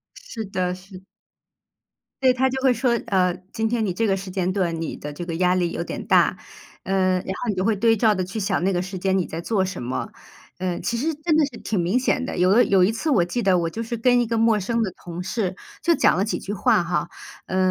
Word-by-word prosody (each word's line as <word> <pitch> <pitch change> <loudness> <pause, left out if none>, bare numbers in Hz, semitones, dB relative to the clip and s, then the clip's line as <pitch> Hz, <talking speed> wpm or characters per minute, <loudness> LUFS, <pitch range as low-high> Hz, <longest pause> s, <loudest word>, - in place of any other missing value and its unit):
是 225 -2 -7
的， 185 -2 -2
是。 185 0 -13 1.2
对， 260 -1 +6
它 260 +1 +2
就 265 +1 -3
会 260 -2 +4
说， 235 0 +1
呃， 185 -4 +2 0.2
今 220 0 0
天 225 -1 0
你 185 - -1
这 225 - 0
个 195 - +2
时 195 0 -7
间 185 -1 -1
段 175 -4 -1
你 165 - -4
的 150 - -7
这 160 +4 -6
个 170 -1 -4
压 180 +1 +3
力 175 -2 +1
有 170 - -3
点 - - -6
大， - - +4 0.5
呃， 190 -1 +1
然 - - -8
后 190 +5 -4
你 210 - +1
就 185 0 -1
会 220 0 +2
对 225 +2 +3
照 220 0 +4
的 185 -3 -1
去 195 +4 -5
想 190 -3 0
那 195 - +2
个 175 -1 0
时 190 0 -6
间 190 +1 +1
你 185 - +1
在 165 - -6
做 190 +2 0
什 190 0 -5
么？ 125 +1 -4 0.5
嗯， 180 -1 -3
其 235 - -1
实 310 +7 -1
真 305 +2 0
的 310 - +5
是 245 -5 -10
挺 215 - -2
明 175 +6 +1
显 255 0 +1
的， - - -4
有 180 +1 +3
的 240 +4 +6
有 195 -2 +3
一 185 - +4
次 230 +8 -3
我 220 - +4
记 180 +8 -2
得 195 -4 +3
我 165 -1 -1
就 230 +6 -4
是 235 +1 -4
跟 245 +2 +3
一 240 - +1
个 230 +1 -1
陌 225 -1 +3
生 230 +4 -1
的 205 - -1
同 175 0 -5
事， 190 0 -2 0.3
就 340 - +3
讲 - - +3
了 195 - +2
几 215 - -2
句 200 - -5
话 190 -2 +3
哈， 175 0 -1 0.4
嗯， 185 0 +1
195 Hz, 280 characters per minute, -23 LUFS, 180-230 Hz, 1.2 s, 对